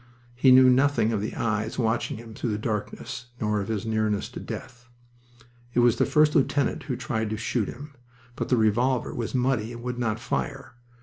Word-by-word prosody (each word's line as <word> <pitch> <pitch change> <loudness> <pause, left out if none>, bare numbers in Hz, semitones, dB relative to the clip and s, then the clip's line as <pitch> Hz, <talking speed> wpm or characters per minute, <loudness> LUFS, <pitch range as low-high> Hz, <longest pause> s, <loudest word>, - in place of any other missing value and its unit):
He 125 +2 +4
knew 130 0 +8
nothing 130 -3 +3
of 105 - 0
the 105 - -4
eyes 110 -1 -1
watching 115 -3 0
him 115 0 -10
through 115 - -3
the 105 - -1
darkness 110 +3 -4
nor 105 -1 0
of 100 - -5
his 110 -1 -2
nearness 110 -2 0
to - - -8
death. 120 -1 -8 0.9
It 120 - +5
was 120 -2 +4
the - - +2
first 150 0 +4
lieutenant 140 -2 +1
who 135 -3 -2
tried 110 -3 -2
to 110 - -3
shoot 110 -1 -1
him. 140 +4 -9 0.4
But - - -3
the 125 - +3
revolver 120 +3 +2
was 120 +2 -4
muddy 125 -3 +1
and 120 0 -9
would 125 0 -4
not 110 -2 -1
fire. 65 - -3
115 Hz, 195 wpm, -26 LUFS, 110-125 Hz, 0.9 s, knew